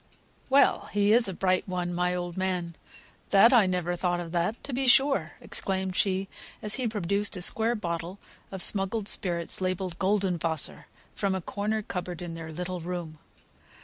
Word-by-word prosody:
Well! 275 +1 +4
he 205 +1 +3
is 235 -1 +5
a 190 - -3
bright 185 0 +1
one, 180 -1 -2
my 180 +1 0
old 175 -1 -4
man! 180 -3 -2 0.5
That 205 +6 +6
I 225 -6 +6
never 180 -1 -1
thought 175 0 -1
of 170 -1 -6
that, 175 +5 0
to 280 - -6
be 265 +1 0
sure!" 270 +2 +4
exclaimed 190 -1 -3
she, 195 0 +1 0.3
as 210 0 +2
he 255 -3 +1
produced 200 -1 -2
a - - -5
square 225 +5 +3
bottle 170 -2 -4 0.3
of 190 -2 +1
smuggled 200 +1 +1
spirits, 175 -4 0
labelled 185 -1 -2
"Golden 190 -2 +1
Wasser," 160 -2 -2 0.3
from 195 -2 -1
a - - -1
corner 210 +4 -2
cupboard 180 -3 -5
in 170 -1 -6
their 165 -1 -7
little 180 +2 -4
room. 170 -2 -6
185 Hz, 175 wpm, -27 LUFS, 175-205 Hz, 0.5 s, That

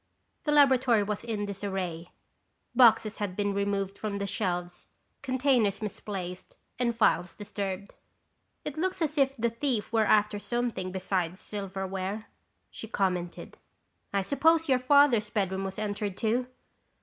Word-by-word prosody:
The 300 - +1
laboratory 260 -6 +5
was 210 +1 -3
in 220 -3 -2
disarray. 190 -4 -4 0.6
Boxes 225 -3 +5
had 200 -3 -2
been 205 0 0
removed 200 0 -1
from 210 -2 -3
the 200 0 -2
shelves, 180 -3 -3 0.3
containers 255 -6 +2
misplaced 190 -3 -6 0.2
and 235 -2 +1
files 180 -6 +2
disturbed. 200 -1 -5 0.7
"It 300 +1 -4
looks 370 0 0
as 305 -1 -1
if 275 0 +3
the 235 -2 0
thief 230 -3 -1
were 220 -1 +4
after 210 0 +3
something 235 -5 -2
besides 185 -1 -2
silverware," 195 +1 -4 0.5
she 225 - -8
commented. 180 -5 -2 0.5
"I 200 -1 +1
suppose 325 - +3
your 260 -2 +3
Father's 255 -5 +4
bedroom 195 -3 -1
was 190 - -5
entered 205 -2 -3
too?" 240 +3 0
210 Hz, 135 wpm, -29 LUFS, 195-240 Hz, 0.7 s, laboratory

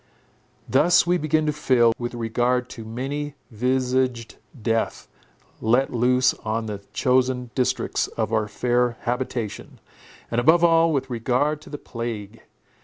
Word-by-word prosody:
Thus 170 +8 +4
we 175 0 +2
began 155 +1 +1
to 150 - 0
feel, 125 -6 +3
with 120 0 -4
regard 120 +2 0
to 115 - -8
many 140 +6 -4 0.2
visaged 125 0 0 0.2
death 115 +1 -1 0.5
let 120 +5 +2
loose 125 +2 +3
on 110 +1 -2
the 105 -2 -5
chosen 125 -1 +1
districts 130 -2 0
of 115 - -3
our 110 -1 +1
fair 120 +2 0
habitation, 120 -3 -4 0.5
and 120 +1 +1
above 165 +6 +5
all, 165 -1 +5
with 135 -3 -2
regard 130 +6 0
to - - -13
the 145 - -5
plague. 115 -4 -6
125 Hz, 135 wpm, -23 LUFS, 115-135 Hz, 0.5 s, above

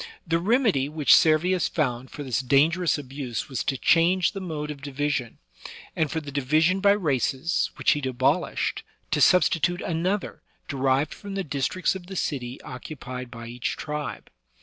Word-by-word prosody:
The 165 -1 +1
remedy 200 - +2
which 150 -1 +5
Servius 170 +3 +3
found 130 -5 -2
for 145 - -7
this 130 -2 -1
dangerous 155 +7 +3
abuse 135 -3 -5
was 130 - -3
to 135 - 0
change 175 +5 +3
the 195 - -6
mode 155 -5 -4
of 140 -2 -9
division, 140 -3 -2 0.6
and 160 -2 +1
for 160 - -2
the 145 -2 -8
division 155 +7 +2
by 200 +1 +5
races, 150 - 0
which - - +2
he 150 - 0
abolished, 130 -2 0 0.3
to - - +1
substitute 175 -1 +4
another 180 +5 -2 0.3
de 140 - -5
rived 135 +2 +1
from 200 -1 -8
the 195 - -1
districts 145 +4 -1
of 185 -2 -9
the 190 - -7
city 130 -7 -3
occupied 130 -1 -7
by 115 -1 -9
each 120 +1 -4
tribe. 150 -1 -5
150 Hz, 165 wpm, -25 LUFS, 135-175 Hz, 0.6 s, which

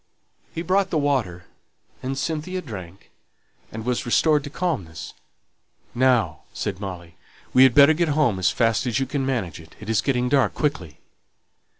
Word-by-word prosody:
He 165 - -5
brought 190 +2 +1
the 165 - 0
water, 125 - -1 0.6
and 135 +1 -3
Cynthia 160 +6 -3
drank, 95 - -10 0.6
and 110 +1 -7
was 125 -1 -1
restored 150 +4 +3
to - - -6
calmness. 125 - -4 0.8
"Now," 125 -3 +2
said 95 -2 -4
Molly, 90 -4 -8 0.4
"we 130 - +6
had 130 -2 +6
better 145 +2 +8
go 170 +2 0
home 140 -10 +2
as 95 - +3
fast 115 +1 +1
as 120 +1 0
you 135 - 0
can 135 +1 -2
manage 115 -12 -2
it; 80 -1 -15
it's 105 0 0
getting 125 0 0
dark 130 -4 +2
quickly." 90 - -2
125 Hz, 160 wpm, -23 LUFS, 100-145 Hz, 0.8 s, better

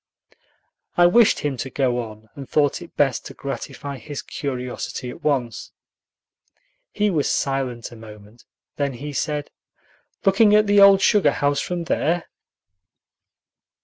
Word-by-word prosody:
I 175 - +6
wished 225 +5 +5
him 145 -3 -2
to 135 - -4
go 130 -3 0
on, 110 -2 -8
and 140 -2 -10
thought 145 -2 +1
it 170 - -12
best 135 -3 +1
to - - -11
gratify 140 0 -6
his 140 +5 -7
curiosity 125 -2 -5
at - - -12
once. 125 -7 -2 1.2
He 210 -1 +1
was 150 -5 0
silent 130 -4 -2
a - - -11
moment; 110 0 -14 0.3
then 140 -2 -1
he 145 +4 -7
said, 150 0 -3 0.7
"Looking 205 +2 +5
at 210 0 +5
the 205 0 +4
old 200 -1 +7
sugar 210 -4 +4
house 145 0 0
from 175 -1 -3
there?" 165 +1 0
140 Hz, 140 wpm, -22 LUFS, 125-175 Hz, 1.2 s, old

